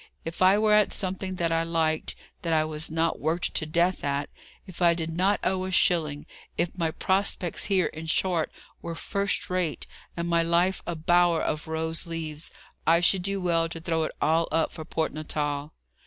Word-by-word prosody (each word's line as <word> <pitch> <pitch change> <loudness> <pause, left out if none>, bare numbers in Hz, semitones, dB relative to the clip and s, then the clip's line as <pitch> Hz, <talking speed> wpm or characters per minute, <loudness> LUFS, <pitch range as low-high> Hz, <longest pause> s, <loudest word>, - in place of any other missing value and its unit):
If 165 +2 -6
I 190 +2 +6
were 215 0 +3
at 210 -1 +4
something 185 0 -3
that 170 -2 0
I 165 0 +2
liked, 165 -1 0 0.3
that 165 -1 -1
I 155 -1 +3
was 155 0 -2
not 160 +1 0
worked 165 +4 -1
to 155 - -1
death 170 +3 +1
at; 140 0 -1 0.3
if 185 -2 -11
I 170 -1 +5
did 165 -1 -3
not 190 +4 +2
owe 185 0 0
a - - -3
shilling; 155 -5 +2 0.3
if 170 0 -1
my 165 -3 0
prospects 190 0 0
here, 190 -4 +2
in 160 +1 -5
short, 170 0 +1 0.3
were 170 -1 -5
first 200 +4 -1
rate, 180 -4 -1 0.3
and 170 0 -2
my 170 -1 +3
life 170 +3 +2
a 175 - -2
bower 175 +1 +3
of 155 +1 -2
rose 160 +1 -2
leaves, 160 -2 -5 0.4
I 165 +1 +6
should 180 +2 +3
do 195 +2 -1
well 165 -2 +1
to 165 - -6
throw 165 0 -1
it - - -4
all 165 +1 +2
up 160 +1 +1
for 160 - -7
Port 160 -1 -1
Natal." 150 -1 -3
165 Hz, 195 wpm, -27 LUFS, 160-180 Hz, 0.4 s, I